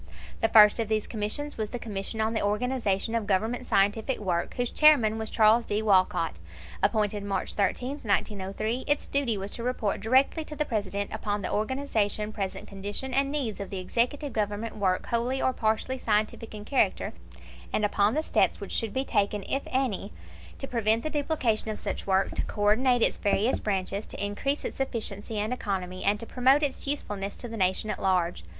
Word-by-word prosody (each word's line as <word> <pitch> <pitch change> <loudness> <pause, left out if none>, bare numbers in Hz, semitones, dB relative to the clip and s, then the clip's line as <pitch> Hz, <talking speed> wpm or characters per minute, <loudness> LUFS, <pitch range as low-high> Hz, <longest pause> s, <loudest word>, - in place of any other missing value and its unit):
The 225 - +3
first 210 0 +7
of 225 - 0
these 215 -1 0
Commissions 230 +7 -3
was 215 -1 -1
the 245 - -4
Commission 220 -1 -4
on 220 +1 0
the 220 - 0
Organization 215 -1 0
of 230 -3 -1
Government 220 +5 0
Scientific 210 +6 +2
Work, 180 -4 -2
whose 245 -1 -1
Chairman 245 -8 +5
was 220 -1 -3
Charles 225 +1 +4
D. 210 +1 0
Walcott. 185 - +2 0.4
Appointed 210 -1 +1
March 200 -1 -2
13, 250 +8 -1
1903, 210 +3 -1
its 290 0 +1
duty 270 -6 0
was 195 +1 -5
to - - -5
report 235 -5 -1
directly 265 +8 +3
to 300 - -7
the 300 - 0
President 200 -4 -2
"upon 205 -1 -2
the - - -2
organization, 215 -3 -1
present 195 -3 -4
condition, 205 +7 -5
and 275 +1 +2
needs 260 -9 -2
of 200 - -5
the 195 - -5
Executive 245 +9 -1
Government 210 +1 -2
work 190 -3 0
wholly 240 +3 0
or 260 - +1
partly 225 +3 -1
scientific 215 0 -1
in 210 0 -8
character, 275 - +1 0.6
and 215 - +1
upon 205 +2 +2
the 310 - +1
steps - - +2
which - - -7
should 225 -3 0
be 265 +1 0
taken, 205 -2 0
if 275 - +1
any, 250 -7 -1 0.5
to 270 - -5
prevent 225 -2 +1
the 310 - -3
duplication 280 -8 0
of 215 - -4
such - - -4
work, 190 0 +2
to - - -2
co 205 - -4
ordinate 245 +3 +4
its - - +2
various 210 +4 +1
branches, 195 0 -2
to - - -3
increase 275 +8 -2
its - - -5
efficiency 220 -5 -3
and 210 +4 0
economy, 185 -6 -3
and 205 +1 +2
to 230 - -5
promote 265 +5 +3
its 280 -1 -1
usefulness 205 -8 -2
to 245 - -5
the 230 - -7
Nation 190 +1 +1
at 205 - -5
large." 180 - +1
215 Hz, 190 wpm, -27 LUFS, 205-250 Hz, 0.6 s, first